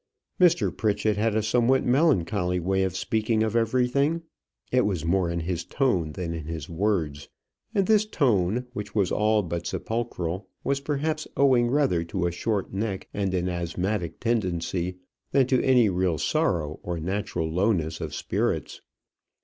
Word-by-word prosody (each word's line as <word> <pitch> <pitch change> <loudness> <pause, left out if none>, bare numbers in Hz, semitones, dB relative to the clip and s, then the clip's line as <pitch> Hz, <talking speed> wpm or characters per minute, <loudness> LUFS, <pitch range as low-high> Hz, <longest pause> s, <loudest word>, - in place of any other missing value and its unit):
Mr. 175 -2 +4
Pritchett 105 0 +1
had 110 +1 +1
a 110 - +1
somewhat 125 +4 +2
melancholy 100 - +2
way 95 +2 0
of 95 -1 -1
speaking 110 +2 0
of 110 0 -1
everything. 130 +7 +1 0.5
It 125 0 +4
was 90 -6 -2
more 90 0 +2
in 85 0 -2
his 85 0 -2
tone 90 - 0
than 85 -1 -4
in 80 -2 -5
his 80 -2 -5
words. 85 -5 -1 0.5
And 195 -2 +3
this 215 +1 +3
tone, 120 - +1
which 105 -4 -6
was 100 -4 +2
all 105 0 +2
but 85 -1 -4
sepulchral, 95 -5 -3 0.2
was 140 0 0
perhaps 155 +2 -2
owing 130 -3 +4
rather 130 - +2
to 90 +1 -2
a 85 - +1
short 100 +3 -2
neck 100 -1 -3
and 100 -2 -1
an 90 0 0
asthmatic 90 +1 -2
tendency 90 -5 -1 0.4
than 135 -2 +5
to 130 0 +2
any 125 -4 +5
real 90 -3 +1
sorrow 75 +1 0
or 85 -1 -4
natural 95 -1 -2
lowness 85 -3 0
of - - -4
spirits. - - -2
100 Hz, 155 wpm, -26 LUFS, 85-120 Hz, 0.5 s, than